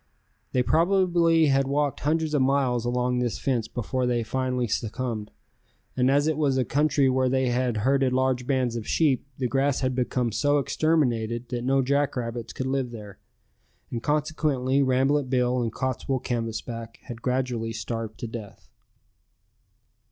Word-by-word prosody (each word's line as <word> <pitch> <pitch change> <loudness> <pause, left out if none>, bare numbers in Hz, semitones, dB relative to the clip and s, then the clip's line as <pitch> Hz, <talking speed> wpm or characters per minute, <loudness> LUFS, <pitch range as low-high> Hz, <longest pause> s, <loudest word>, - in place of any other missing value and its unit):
They 125 - +2
probably 170 0 +3
had 135 -2 +2
walked 145 0 0
hundreds 155 +1 0
of 145 - +3
miles 130 -3 +1
along 125 0 0
this 120 -2 -1
fence 120 -5 -1
before 125 +2 -2
they 120 -1 +1
finally 125 +1 -1
succumbed, 110 0 -3 0.7
and 125 0 +2
as 145 +2 +3
it 155 -1 0
was 140 -4 +1
a 130 - +1
country 145 +2 +2
where 130 0 +2
they 130 0 +1
had 120 -1 0
herded 135 -1 +3
large 130 -1 0
bands 130 -4 +1
of 115 -2 -5
sheep 140 -4 +1
the 130 - 0
grass 135 +2 +1
had 130 -1 0
become 125 -1 0
so 145 +6 +2
exterminated 125 -6 0
that 120 -1 -3
no 135 +1 +2
jackrabbits 125 -4 -1
could 130 - -4
live 130 -1 -1
there, 105 -4 -10 0.7
and 115 - -3
consequently 145 -3 0
Rambolet 135 +1 +2
Bill 125 -1 +1
and 115 -2 -1
Cottswool 130 +1 -2
Canvasback 115 -1 -4
had 120 -3 -8
gradually 125 -3 -1
starved 115 0 -5
to 120 - -3
death. 110 -3 -9
130 Hz, 155 wpm, -26 LUFS, 120-140 Hz, 0.7 s, probably